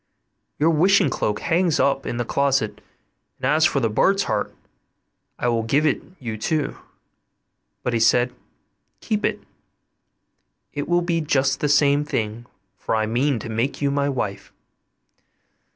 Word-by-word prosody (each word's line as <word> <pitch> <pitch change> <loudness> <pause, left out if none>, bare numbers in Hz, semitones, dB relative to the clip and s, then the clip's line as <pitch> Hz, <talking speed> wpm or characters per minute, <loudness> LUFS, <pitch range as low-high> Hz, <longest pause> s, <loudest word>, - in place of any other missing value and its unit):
Your 160 +3 +3
wishing 180 0 +4
cloak 105 -4 -1
hangs 170 -1 +1
up 135 -1 +1
in 120 - -3
the 120 - -1
closet, 135 -4 0 0.6
and - - -5
as 155 +4 +3
for 150 - 0
the 115 - +1
bird's 195 - +2
heart, 105 -1 -2 0.9
I - - -1
will 115 -1 +1
give 140 +7 +1
it 150 - +1 0.2
you 115 -4 -5
too.' 155 +5 -1 1.0
But 125 - -1
he 115 - +1
said, 120 +2 +3 0.7
'Keep 210 -1 -2
it, - - -1 1.3
it 145 +1 -4
will 175 0 +2
be 170 -1 0
just 135 -2 +1
the 150 - 0
same 145 0 +4
thing, 115 -4 -3 0.3
for - - -1
I 110 0 +1
mean 125 +5 +1
to 115 - -7
make 115 +5 -1
you 140 -1 +1
my 140 0 0
wife. 100 -7 -4
140 Hz, 150 wpm, -22 LUFS, 115-150 Hz, 1.3 s, wishing